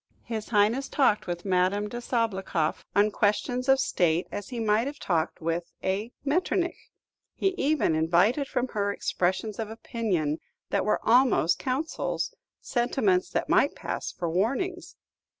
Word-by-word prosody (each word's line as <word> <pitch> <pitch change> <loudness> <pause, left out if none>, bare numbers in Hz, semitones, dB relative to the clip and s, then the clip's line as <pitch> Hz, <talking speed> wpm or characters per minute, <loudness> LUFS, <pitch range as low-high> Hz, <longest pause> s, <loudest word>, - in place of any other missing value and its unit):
His 220 -2 -5
Highness 230 +5 +2
talked 260 -10 +2
with 175 +1 -4
Madame 190 +2 +2
de 240 +3 -6
Sabloukoff 195 -10 -1
on 205 +1 +4
questions 245 +6 0
of 270 0 +6
state 175 -7 +1
as 205 - -5
he 245 -2 -5
might 220 +2 +2
have 290 +1 -5
talked 170 - -1
with 165 +1 -2
a 200 +5 -1
Metternich; 350 +3 0 0.5
he 390 - +2
even 305 - +1
invited 180 - +2
from 250 -1 -1
her 205 -1 -1
expressions 195 +3 -1
of 220 -1 -3
opinion 195 -9 -2 0.3
that - - +1
were 210 - 0
almost 240 -8 +4
counsels, 285 - -2 0.3
sentiments 350 +10 +1
that - - -1
might - - +3
pass - - -4
for 175 - -4
warnings. 270 - -1
215 Hz, 145 wpm, -27 LUFS, 185-260 Hz, 0.5 s, of